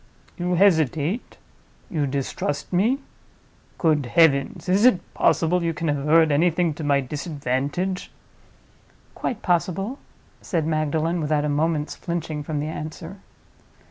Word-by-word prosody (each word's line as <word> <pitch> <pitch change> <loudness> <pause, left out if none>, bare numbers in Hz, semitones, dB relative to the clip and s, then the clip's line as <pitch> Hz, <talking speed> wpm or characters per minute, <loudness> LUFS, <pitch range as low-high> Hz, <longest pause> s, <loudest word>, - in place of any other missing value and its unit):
You 180 0 -1
hesitate? 165 - +2 0.5
You 150 -4 -1
distrust 140 +3 -3
me? 220 +9 +3 0.8
Good 150 -6 +2
heavens! 145 +3 +3
is 190 +4 +3
it 245 -7 +3
possible 165 +2 +2
you 165 -1 -1
can 165 0 -2
have 145 -1 -1
heard 160 0 +5
anything 165 +2 +2
to 155 - -7
my 140 -1 +2
disadvantage?" 145 +5 -3 1.0
"Quite 225 - -4
possible," 190 - 0 0.4
said 165 -5 -1
Magdalen, 160 +2 0
without 150 -1 +1
a - - 0
moment's 150 +1 0
flinching 165 -3 -4
from 150 0 -3
the 145 - -2
answer. 160 +4 -6
160 Hz, 125 wpm, -23 LUFS, 145-175 Hz, 1.0 s, heard